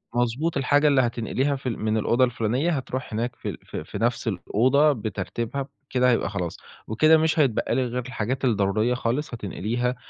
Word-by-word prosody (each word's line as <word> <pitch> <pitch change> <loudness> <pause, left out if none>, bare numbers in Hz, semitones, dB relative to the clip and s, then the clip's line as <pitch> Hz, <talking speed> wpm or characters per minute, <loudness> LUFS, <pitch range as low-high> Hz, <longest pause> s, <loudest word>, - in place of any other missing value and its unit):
مضبوط، 125 +7 0
الحاجة 145 +3 +3
اللي 140 -2 +5
هتنقليها 125 +4 0
في 130 -1 -4
ال 115 - -4
من 110 0 0
الأوضة 120 +4 +2
الفلُانية 125 +6 +1
هتروح 130 -4 -4
هناك 115 +3 -2
في - - -5
في - - -6
في - - -7
نفس 120 0 0
الأوضة 130 - +3
بترتيبها 115 +4 -4 0.2
بكده 125 -1 +3
هيبقى 115 - +1
خلاص. 90 -5 -4 0.3
وكده 155 +9 +5
مش 160 0 +1
هيتبقى 130 -7 +2
لك 125 -2 0
غير 125 -1 -3
الحاجات 130 +2 -2
الضرورية 110 +1 +2
خالص 125 +3 -2
هتنقليها 120 +4 -2
125 Hz, 170 wpm, -25 LUFS, 110-135 Hz, 0.3 s, اللي